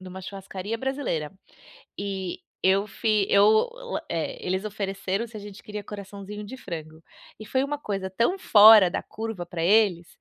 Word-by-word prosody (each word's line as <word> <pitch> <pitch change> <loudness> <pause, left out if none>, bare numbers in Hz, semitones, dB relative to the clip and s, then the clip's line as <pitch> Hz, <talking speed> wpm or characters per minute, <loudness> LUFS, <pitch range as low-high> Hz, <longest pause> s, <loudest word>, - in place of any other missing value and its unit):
numa 185 0 -9
churrascaria 195 +2 -6
brasileira, 255 - -3 0.7
e 195 -3 -4 0.2
eu 195 +2 +3
fi 210 0 +1
eu, 210 +2 +5 0.4
eh, 165 - -2
eles 185 +1 0
ofereceram 195 0 -3
se 225 -1 -12
a - - -6
gente 205 0 -11
queria 210 0 -6
coraçãozinho 200 0 -8
de 220 +6 -8
frango. 160 -7 -8 0.4
E 215 - -8
foi 260 +4 +1
uma 290 +1 -3
coisa 195 -7 -4
tão 235 - +1
fora 210 - +8
da - - -3
curva 220 -4 -6
para 170 -1 -5
eles, 190 -3 +3
200 Hz, 160 wpm, -26 LUFS, 190-220 Hz, 0.7 s, fora